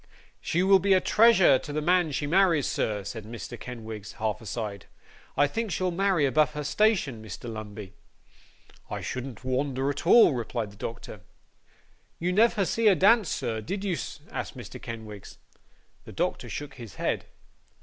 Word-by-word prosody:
'She 175 Hz, +3 st, 0 dB
will 195 Hz, 0 st, +6 dB
be 195 Hz, +1 st, +3 dB
a 185 Hz, -, +5 dB
treasure 195 Hz, -, +5 dB
to 150 Hz, -, -8 dB
the 150 Hz, -, -1 dB
man 175 Hz, +1 st, +2 dB
she 145 Hz, +1 st, -2 dB
marries, 170 Hz, -3 st, +3 dB
sir,' 105 Hz, -2 st, -1 dB
said 110 Hz, +2 st, -6 dB
Mr. 115 Hz, +2 st, -7 dB
Kenwigs, 110 Hz, -4 st, -8 dB
half 110 Hz, +1 st, -2 dB
aside; 105 Hz, -2 st, -5 dB, 0.5 s
'I 145 Hz, -, +5 dB
think 225 Hz, +9 st, -3 dB
she'll 185 Hz, +1 st, -1 dB
marry 185 Hz, -3 st, +2 dB
above 150 Hz, +3 st, +2 dB
her 150 Hz, +1 st, -4 dB
station, 150 Hz, -, +1 dB
Mr. 110 Hz, +3 st, -8 dB
Lumbey.' 105 Hz, -3 st, -7 dB, 1.0 s
'I -, -, -4 dB
shouldn't 130 Hz, -3 st, -6 dB
wonder 130 Hz, +1 st, -1 dB
at 145 Hz, -, -6 dB
all,' 230 Hz, -6 st, +7 dB
replied 115 Hz, -3 st, -3 dB
the -, -, -16 dB
doctor. 110 Hz, -1 st, -7 dB, 1.0 s
'You 180 Hz, +2 st, -1 dB
never 215 Hz, -1 st, +3 dB
see 225 Hz, +4 st, +1 dB
her 200 Hz, -, +6 dB
dance, 205 Hz, 0 st, +4 dB
sir, 110 Hz, -1 st, -2 dB
did 195 Hz, -, -4 dB
you?' 190 Hz, -4 st, 0 dB, 0.4 s
asked -, -, -5 dB
Mr. -, -, -9 dB
Kenwigs. 110 Hz, -3 st, -8 dB, 0.7 s
The -, -, -10 dB
doctor -, -, -2 dB
shook 145 Hz, 0 st, -6 dB
his 115 Hz, -6 st, -10 dB
head. -, -, -2 dB
140 Hz, 165 wpm, -27 LUFS, 110-185 Hz, 1.0 s, all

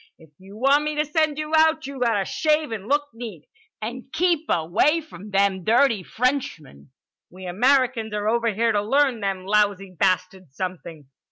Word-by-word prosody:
If 160 Hz, -2 st, -19 dB
you 195 Hz, +2 st, -13 dB
want 275 Hz, +5 st, +3 dB
me 300 Hz, 0 st, -2 dB
to 300 Hz, +1 st, 0 dB
send 305 Hz, -1 st, 0 dB
you 305 Hz, +1 st, -5 dB
out, 315 Hz, -1 st, +3 dB
you 275 Hz, -1 st, -7 dB
gotta 225 Hz, -5 st, +1 dB
shave 305 Hz, +1 st, 0 dB
and 210 Hz, -2 st, -6 dB
look 290 Hz, +2 st, 0 dB
neat, 225 Hz, -10 st, -9 dB, 0.4 s
and 250 Hz, +4 st, -7 dB
keep 330 Hz, -1 st, 0 dB
away 175 Hz, -, +2 dB
from 210 Hz, -, -12 dB
them 195 Hz, -2 st, +1 dB
dirty 230 Hz, 0 st, +3 dB
Frenchmen. 180 Hz, -, -3 dB, 0.4 s
We 185 Hz, +1 st, -11 dB
Americans 245 Hz, +3 st, +1 dB
are 210 Hz, 0 st, -2 dB
over 230 Hz, +1 st, +1 dB
here 230 Hz, +3 st, +1 dB
to 205 Hz, -1 st, +1 dB
learn 265 Hz, +2 st, +1 dB
them 195 Hz, -3 st, -3 dB
lousy 200 Hz, -2 st, +1 dB
bastards 185 Hz, -3 st, -1 dB
something." 170 Hz, -4 st, -6 dB
225 Hz, 170 wpm, -23 LUFS, 190-280 Hz, 0.4 s, want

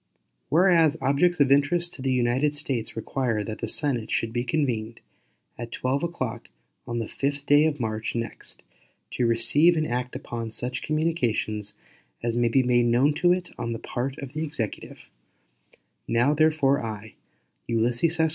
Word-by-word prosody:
Whereas 165 Hz, -2 st, +4 dB
objects 175 Hz, +6 st, +2 dB
of 140 Hz, -2 st, +4 dB
interest 170 Hz, +5 st, +2 dB
to 135 Hz, -, -10 dB
the 135 Hz, 0 st, 0 dB
United 130 Hz, +4 st, +1 dB
States 135 Hz, -6 st, -3 dB
require 115 Hz, -1 st, -1 dB
that 110 Hz, +1 st, -6 dB
the -, -, -2 dB
Senate 130 Hz, -7 st, -1 dB
should 115 Hz, 0 st, -1 dB
be 120 Hz, 0 st, 0 dB
convened 120 Hz, -5 st, -1 dB, 0.6 s
at 120 Hz, -1 st, -6 dB
12 130 Hz, +4 st, -1 dB
o'clock 170 Hz, -9 st, -4 dB, 0.4 s
on 120 Hz, -, -3 dB
the 115 Hz, -, -1 dB
12th 140 Hz, +4 st, -3 dB
day 145 Hz, +1 st, +5 dB
of 155 Hz, -, -1 dB
April, 115 Hz, -6 st, -2 dB
1869, 115 Hz, +2 st, -5 dB, 0.4 s
to 125 Hz, -, 0 dB
receive 125 Hz, +9 st, +4 dB
and 155 Hz, -, +1 dB
act 125 Hz, +1 st, -3 dB
upon 115 Hz, -1 st, -5 dB
such 125 Hz, +3 st, -3 dB
communications 120 Hz, -10 st, -1 dB, 0.5 s
as 120 Hz, -1 st, -1 dB
may 120 Hz, -1 st, +2 dB
be 130 Hz, +3 st, +3 dB
made 120 Hz, +3 st, +3 dB
to 175 Hz, +2 st, +4 dB
it 180 Hz, 0 st, -1 dB
on 115 Hz, -, -2 dB
the -, -, -4 dB
part 130 Hz, +3 st, -4 dB
of 135 Hz, 0 st, -8 dB
the 155 Hz, +1 st, -2 dB
Executive: 145 Hz, -9 st, -5 dB, 1.0 s
Now, 120 Hz, +5 st, +3 dB
therefore, 150 Hz, -3 st, +3 dB
I, 110 Hz, -1 st, -6 dB, 0.5 s
U.S. 120 Hz, +1 st, 0 dB
130 Hz, 155 wpm, -25 LUFS, 115-150 Hz, 1.0 s, day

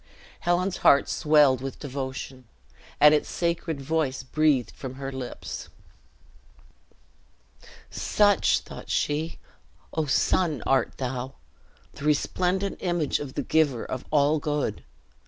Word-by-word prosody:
Helen's 175 Hz, +2 st, 0 dB
heart 140 Hz, -, +5 dB
swelled 150 Hz, -4 st, +4 dB
with 135 Hz, -1 st, -5 dB
devotion, 130 Hz, -2 st, -6 dB, 0.5 s
and 150 Hz, 0 st, +8 dB
its 150 Hz, -, +1 dB
sacred 170 Hz, -3 st, -2 dB
voice 140 Hz, -2 st, -1 dB
breathed 135 Hz, -4 st, +1 dB
from 130 Hz, -1 st, -8 dB
her 135 Hz, 0 st, -5 dB
lips. 130 Hz, -2 st, -7 dB, 2.2 s
"Such," 205 Hz, -3 st, +2 dB
thought -, -, -11 dB
she, 155 Hz, +3 st, -1 dB, 0.6 s
"O 160 Hz, -2 st, -1 dB
sun, 150 Hz, -, +1 dB
art 135 Hz, -2 st, +1 dB
thou! 130 Hz, 0 st, -4 dB, 0.6 s
The 140 Hz, -, -8 dB
resplendent 180 Hz, +6 st, 0 dB
image 175 Hz, -5 st, 0 dB
of 140 Hz, -3 st, -7 dB
the -, -, -1 dB
Giver 145 Hz, -7 st, +1 dB
of 130 Hz, -, -5 dB
all 150 Hz, +1 st, +3 dB
Good. 145 Hz, -8 st, -2 dB
145 Hz, 115 wpm, -26 LUFS, 130-160 Hz, 2.2 s, and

